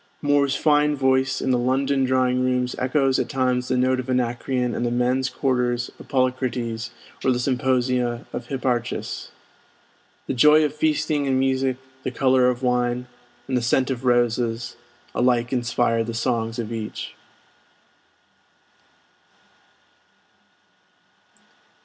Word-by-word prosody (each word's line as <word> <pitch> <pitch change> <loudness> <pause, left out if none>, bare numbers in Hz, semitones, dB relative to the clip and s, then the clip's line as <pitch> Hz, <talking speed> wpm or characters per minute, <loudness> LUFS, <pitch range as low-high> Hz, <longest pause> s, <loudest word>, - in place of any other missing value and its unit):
Moore's 145 -1 +2
fine 150 0 +3
voice 130 -1 +1
in 130 - +1
the 125 - +2
London 135 +2 +1
drawing 130 0 +1
rooms 125 -1 0
echoes 135 0 +1
at - - -2
times 125 -1 0
the 130 - 0
note 130 +1 +2
of 130 0 -5
Anacreon 125 0 -1
in - - -3
the 120 - 0
men's 125 +2 +1
quarters 125 -2 -1
of - - -12
Polycrates 125 -3 -1 0.3
or 130 - +3
the 125 - 0
symposia 125 -2 0
of - - -5
Hipparchus. 125 -3 -3 1.0
The - - -2
joy 150 +5 +6
of 150 - -2
feasting 150 -1 0
and 130 -1 +2
music, 130 -1 +1 0.2
the - - -3
color 130 0 +3
of 125 +1 -3
wine, 125 0 0 0.4
and 130 - -1
the 125 - +1
scent 130 +3 +1
of 130 -1 -4
roses, 120 -1 +1 0.4
alike 120 0 +1
inspire 120 -2 +1
the 115 0 -5
songs 115 -1 -1
of 115 -1 -4
each. 110 -2 -5
125 Hz, 130 wpm, -23 LUFS, 120-130 Hz, 1.0 s, joy